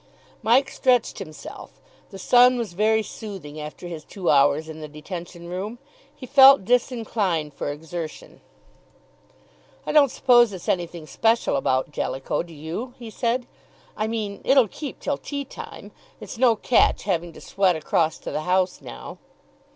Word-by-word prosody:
Mike 255 Hz, +5 st, +4 dB
stretched 250 Hz, -3 st, +1 dB
himself; 155 Hz, 0 st, -10 dB, 0.3 s
the 195 Hz, -, -10 dB
sun 250 Hz, +5 st, +5 dB
was 225 Hz, -7 st, -4 dB
very 220 Hz, +3 st, +2 dB
soothing 190 Hz, -8 st, -8 dB
after 150 Hz, +3 st, -8 dB
his 165 Hz, -3 st, -7 dB
two 185 Hz, +1 st, -2 dB
hours 145 Hz, +2 st, +3 dB
in 160 Hz, 0 st, -9 dB
the 155 Hz, -, -6 dB
detention 170 Hz, +3 st, -8 dB
room; 195 Hz, +6 st, -5 dB, 0.4 s
he 255 Hz, -, -9 dB
felt 270 Hz, -4 st, +7 dB
disinclined 215 Hz, -, 0 dB
for 145 Hz, -, -4 dB
exertion. 160 Hz, +2 st, -8 dB, 1.4 s
"I -, -, -2 dB
don't 290 Hz, -3 st, +6 dB
suppose 240 Hz, -4 st, +4 dB
it's 185 Hz, -, -9 dB
anything 170 Hz, -2 st, -2 dB
special 225 Hz, +5 st, +1 dB
about 130 Hz, 0 st, 0 dB
Jellicoe, 135 Hz, -2 st, -2 dB
do 170 Hz, -1 st, -11 dB
you?" 170 Hz, -, -6 dB
he 235 Hz, -3 st, -9 dB
said. 240 Hz, +2 st, -1 dB, 0.5 s
"I 215 Hz, -, -1 dB
mean, 215 Hz, -3 st, -4 dB
it'll 265 Hz, -3 st, +5 dB
keep 280 Hz, -, -8 dB
till 285 Hz, -, -2 dB
tea 280 Hz, -1 st, -5 dB
time; -, -, -10 dB, 0.3 s
it's 230 Hz, -, -9 dB
no 245 Hz, -3 st, +5 dB
catch 230 Hz, +3 st, +2 dB
having 175 Hz, -3 st, -1 dB
to -, -, -12 dB
sweat 190 Hz, -3 st, +1 dB
across 160 Hz, 0 st, 0 dB
to -, -, -6 dB
the -, -, -2 dB
house 180 Hz, +2 st, 0 dB
now." -, -, -9 dB
195 Hz, 155 wpm, -24 LUFS, 160-240 Hz, 1.4 s, felt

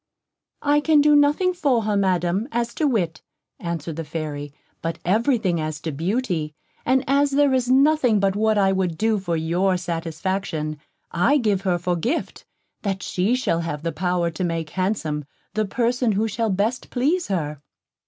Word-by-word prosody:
"I 290 Hz, 0 st, +4 dB
can 305 Hz, 0 st, +4 dB
do 295 Hz, 0 st, +5 dB
nothing 295 Hz, +6 st, +3 dB
for 275 Hz, -9 st, +1 dB
her, 210 Hz, -1 st, 0 dB
Madam, 190 Hz, +1 st, +1 dB
as 235 Hz, -2 st, -1 dB
to 310 Hz, -, +1 dB
wit," 175 Hz, -, -1 dB, 0.4 s
answered 165 Hz, -2 st, -4 dB
the 165 Hz, -, -3 dB
Fairy, 150 Hz, -2 st, -5 dB, 0.3 s
"but 165 Hz, 0 st, -3 dB
everything 215 Hz, -, +2 dB
as 155 Hz, -1 st, -3 dB
to 160 Hz, -, -3 dB
beauty; 165 Hz, -, -2 dB, 0.3 s
and 260 Hz, +1 st, +3 dB
as 280 Hz, +2 st, +3 dB
there 280 Hz, 0 st, +3 dB
is 250 Hz, -1 st, +1 dB
nothing 265 Hz, -4 st, +4 dB
but 195 Hz, 0 st, +1 dB
what 215 Hz, 0 st, +2 dB
I 195 Hz, -1 st, +4 dB
would 185 Hz, -4 st, -1 dB
do 220 Hz, +1 st, +1 dB
for 170 Hz, -3 st, -2 dB
your 180 Hz, +4 st, +1 dB
satisfaction, 165 Hz, -2 st, -3 dB, 0.3 s
I 230 Hz, -, +3 dB
give 210 Hz, -7 st, +1 dB
her 185 Hz, -3 st, +1 dB
for 175 Hz, +1 st, -1 dB
gift, 240 Hz, -, -3 dB, 0.4 s
that 195 Hz, -2 st, -2 dB
she 195 Hz, +7 st, +1 dB
shall 255 Hz, -10 st, 0 dB
have 165 Hz, -3 st, -4 dB
the 165 Hz, -, -1 dB
power 180 Hz, -1 st, 0 dB
to 165 Hz, +3 st, -4 dB
make 165 Hz, -3 st, -2 dB
handsome 185 Hz, -6 st, -1 dB, 0.3 s
the 215 Hz, 0 st, 0 dB
person 235 Hz, +2 st, +1 dB
who 215 Hz, +3 st, +1 dB
shall 225 Hz, +1 st, -1 dB
best 210 Hz, +6 st, -1 dB
please 305 Hz, +8 st, 0 dB
her." 150 Hz, -7 st, -2 dB
195 Hz, 175 wpm, -23 LUFS, 165-245 Hz, 0.4 s, do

